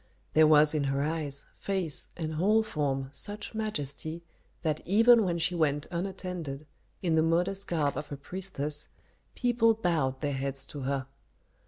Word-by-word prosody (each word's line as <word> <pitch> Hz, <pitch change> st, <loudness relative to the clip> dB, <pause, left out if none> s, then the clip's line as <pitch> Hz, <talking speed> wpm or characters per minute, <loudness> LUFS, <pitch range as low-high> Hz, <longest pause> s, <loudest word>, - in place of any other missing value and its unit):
There 155 Hz, 0 st, +6 dB
was 150 Hz, 0 st, +6 dB
in 150 Hz, -2 st, +1 dB
her 140 Hz, +1 st, 0 dB
eyes, 150 Hz, -2 st, -2 dB
face, 185 Hz, -6 st, -2 dB
and 160 Hz, -2 st, -3 dB
whole 210 Hz, +8 st, +3 dB
form 135 Hz, -8 st, -2 dB
such 205 Hz, +9 st, -1 dB
majesty 165 Hz, -6 st, -3 dB, 0.4 s
that 155 Hz, -2 st, 0 dB
even 225 Hz, +5 st, +6 dB
when 175 Hz, -3 st, 0 dB
she 170 Hz, +2 st, 0 dB
went 150 Hz, -3 st, +1 dB
unattended, 175 Hz, -5 st, -4 dB, 0.4 s
in 170 Hz, -3 st, +2 dB
the 160 Hz, -, +4 dB
modest 180 Hz, +4 st, +1 dB
garb 150 Hz, -4 st, 0 dB
of 150 Hz, -, -5 dB
a 145 Hz, -, -4 dB
priestess, 150 Hz, -3 st, -3 dB, 0.5 s
people 235 Hz, -2 st, +3 dB
bowed 155 Hz, -10 st, 0 dB
their 145 Hz, -1 st, -1 dB
heads 135 Hz, 0 st, -2 dB
to 145 Hz, -, -5 dB
her. 135 Hz, 0 st, -1 dB
160 Hz, 155 wpm, -29 LUFS, 145-190 Hz, 0.5 s, There